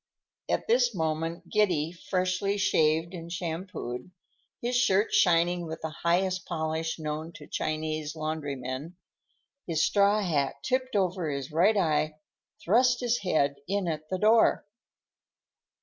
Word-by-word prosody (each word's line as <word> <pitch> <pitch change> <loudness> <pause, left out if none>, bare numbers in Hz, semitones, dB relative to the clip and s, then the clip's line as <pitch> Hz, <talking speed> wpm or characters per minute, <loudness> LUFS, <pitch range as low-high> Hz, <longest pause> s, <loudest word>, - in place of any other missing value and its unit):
At - - 0
this 240 -1 +3
moment 160 +1 -2
Giddy, 175 -7 +1
freshly 185 +2 -1
shaved 160 -2 +2
and 170 -1 -8
shampooed, 170 -7 -5 0.5
his 245 +1 -2
shirt 210 -4 +3
shining 175 -1 +3
with 160 0 -6
the 160 - -4
highest 180 +3 0
polish 160 -1 -2
known 155 +1 -4
to 150 - -11
Chinese 155 0 -3
laundrymen, 145 -1 -4 0.7
his 160 -3 +2
straw 205 +1 +3
hat 145 -7 0
tipped 255 -1 -1
over 185 -4 0
his 140 0 -4
right 190 +7 +3
eye, 155 -4 +1 0.5
thrust 245 +6 +3
his 240 -1 +1
head 145 -7 +1
in 200 -1 -1
at 155 -1 -4
the 185 - -1
door. 220 +3 +4
170 Hz, 130 wpm, -28 LUFS, 155-195 Hz, 0.7 s, door